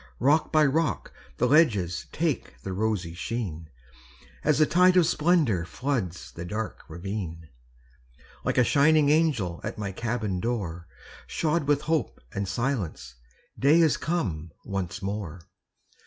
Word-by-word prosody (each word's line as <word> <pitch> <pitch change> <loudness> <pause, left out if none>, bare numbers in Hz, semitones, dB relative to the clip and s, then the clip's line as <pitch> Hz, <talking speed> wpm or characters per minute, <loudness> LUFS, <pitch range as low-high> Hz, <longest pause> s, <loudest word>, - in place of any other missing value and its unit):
Rock 145 +5 +2
by 155 -1 +5
rock 150 +3 0 0.2
the - - +2
ledges 105 - +3
Take 160 -5 -2
the 95 - -4
rosy 100 -4 -1
sheen, 85 -5 -4 0.7
As 150 -2 +3
the 155 - +5
tide 180 +3 +4
of 175 - +6
splendor 150 - +2
Floods 95 - -3
the 85 - -7
dark 105 +5 -4
ravine. 85 -2 -5 0.9
Like - - -1
a 125 - +6
shining 145 +3 +4
angel 140 - +1
At - - -5
my 100 -2 -3
cabin 110 -2 -2
door, 90 -7 -3 0.4
Shod 155 -2 0
with 145 -1 +3
hope 155 -4 -1
and 100 0 -2
silence, 100 - -2 0.5
Day 145 +5 +5
is 160 -3 +4
come 95 - -2 0.2
once 95 -1 -4
more. 95 -4 -4
110 Hz, 135 wpm, -27 LUFS, 90-150 Hz, 0.9 s, of